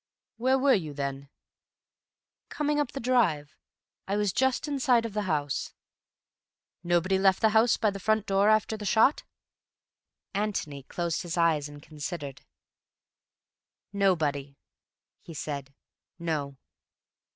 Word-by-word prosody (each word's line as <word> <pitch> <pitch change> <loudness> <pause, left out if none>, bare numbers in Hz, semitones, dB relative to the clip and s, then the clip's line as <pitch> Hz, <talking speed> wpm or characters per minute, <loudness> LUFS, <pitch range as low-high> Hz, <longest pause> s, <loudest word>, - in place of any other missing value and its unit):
"Where 260 +3 +2
were 270 0 +4
you 155 -7 -1
then?" 140 -1 -4 1.2
"Coming 295 0 0
up 290 -4 -1
the 275 - -4
drive. 205 - +1 0.5
I 200 +1 0
was 205 -2 0
just 265 +3 +1
in 285 -2 -2
sight 245 -4 +3
of 225 - -5
the 210 - -1
house." 145 -3 -2 1.1
"Nobody 175 +2 +2
left 190 -1 +4
the 220 - +4
house 220 +2 +4
by 215 -3 +2
the 195 - -7
front 215 +2 +1
door 195 +1 +3
after 215 0 +2
the 215 - -7
shot?" 225 +8 +4 1.1
Antony 195 -9 -2
closed 170 +4 -3
his 175 0 -5
eyes 160 -4 +2
and 145 0 -12
considered. 150 -2 -6 1.5
"Nobody," 150 -8 0 0.6
he 165 - -11
said. 140 -2 -5 0.5
"No." 150 -5 -3
190 Hz, 130 wpm, -28 LUFS, 150-220 Hz, 1.5 s, were